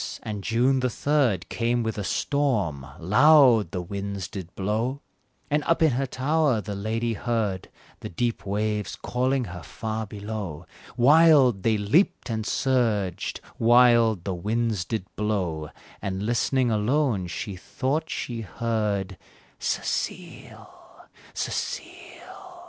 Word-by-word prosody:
and 105 -2 -5
June 125 +5 +2
the 130 0 +1
third 125 - +1
Came 120 0 0
with 110 -1 -2
a 105 - -3
storm 100 - 0
loud 120 - +5
the 90 -3 -4
winds 100 0 -5
did 90 -4 -8
blow 110 +7 -1 0.5
And 150 +1 0
up 165 0 +2
in 160 - +5
her 135 +2 -1
tower 140 -1 +1
the 105 0 -5
lady 110 +3 -2
heard 110 -4 -2 0.3
The - - -7
deep 115 +6 -2
waves 105 0 -2
calling 130 +1 -1
her 90 -5 -7
far 110 +3 -5
below; 100 -5 -6 0.3
Wild 140 -5 +6
they 110 +2 +2
leaped 130 - +1
and 110 0 -2
surged, 115 -9 0 0.2
wild 115 -4 +5
the 95 - -2
winds 105 +1 -1
did 110 -5 -3
blow, 90 -8 -2 0.3
And, 95 +1 -3
listening 120 +2 +1
alone, 110 -2 +1
she 95 +3 -5
thought 140 - -2
she 120 -2 -4
heard 105 -4 -2 0.4
"Cecile! - - -5 0.3
Cecile!" - - -6
110 Hz, 125 wpm, -25 LUFS, 100-125 Hz, 0.5 s, Wild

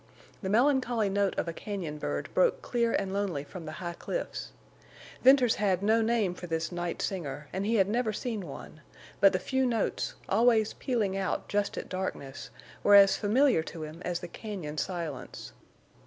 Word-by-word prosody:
The 190 - -3
melancholy 240 -2 +2
note 200 0 0
of - - -1
a 170 - -3
cañon 170 -6 -5
bird - - -3
broke - - +2
clear 235 -1 +1
and 190 -3 -1
lonely 195 -8 -1
from 165 +2 -9
the 155 - -5
high 170 +1 -5
cliffs. - - -5 0.7
Venters 255 -2 +6
had 195 -3 +1
no 220 +2 +4
name 220 -5 +1
for 180 0 -8
this 165 +1 -2
night 175 -1 -3
singer, 150 -6 -4
and 195 +2 -2
he 230 - +2
had 195 -3 +4
never 225 +1 0
seen 215 -4 -4
one, 155 +2 -10 0.4
but 195 - +7
the 185 - +1
few 265 +8 0
notes, 235 -4 -1
always 220 +1 +3
pealing 220 -7 -1
out 195 -1 -2
just 205 0 -1
at - - -4
darkness, 185 -7 -5 0.3
were 205 - +6
as 195 -1 +8
familiar 235 - +3
to 160 0 -7
him 155 +3 -8
as 175 -1 -2
the 175 - -6
cañon 170 -7 -6
silence. 165 -8 -5
195 Hz, 180 wpm, -29 LUFS, 175-225 Hz, 0.7 s, as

